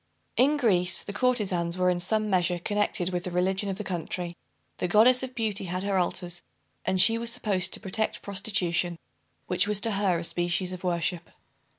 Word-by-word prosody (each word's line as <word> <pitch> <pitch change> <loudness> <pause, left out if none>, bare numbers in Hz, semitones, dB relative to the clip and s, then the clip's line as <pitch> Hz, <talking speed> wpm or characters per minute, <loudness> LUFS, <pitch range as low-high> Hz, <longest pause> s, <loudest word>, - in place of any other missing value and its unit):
In 285 +4 +3
Greece, 180 -9 +2
the 200 - -7
courtezans 200 -8 0
were 180 0 +3
in 175 - -1
some 215 +4 +1
measure 180 -3 +1
connected 185 -1 -1
with 175 -1 -2
the 180 - -3
religion 190 +3 0
of 190 - -3
the 210 - -5
country. 175 -1 -4 0.4
The - - 0
Goddess 230 +7 +6
of 260 -1 -6
Beauty 215 -4 -1
had 180 +1 -3
her 200 -1 +1
altars; 175 0 -1 0.4
and 185 - 0
she 225 +4 +6
was 235 0 +1
supposed 210 -6 +1
to - - 0
protect 215 +2 -3
prostitution, 185 -4 -1 0.5
which 185 +2 +1
was 210 -1 +2
to 225 - +1
her 195 -3 +1
a 165 - -4
species 175 +2 -1
of 185 - -8
worship. 175 -1 -2
185 Hz, 190 wpm, -27 LUFS, 175-210 Hz, 0.5 s, Goddess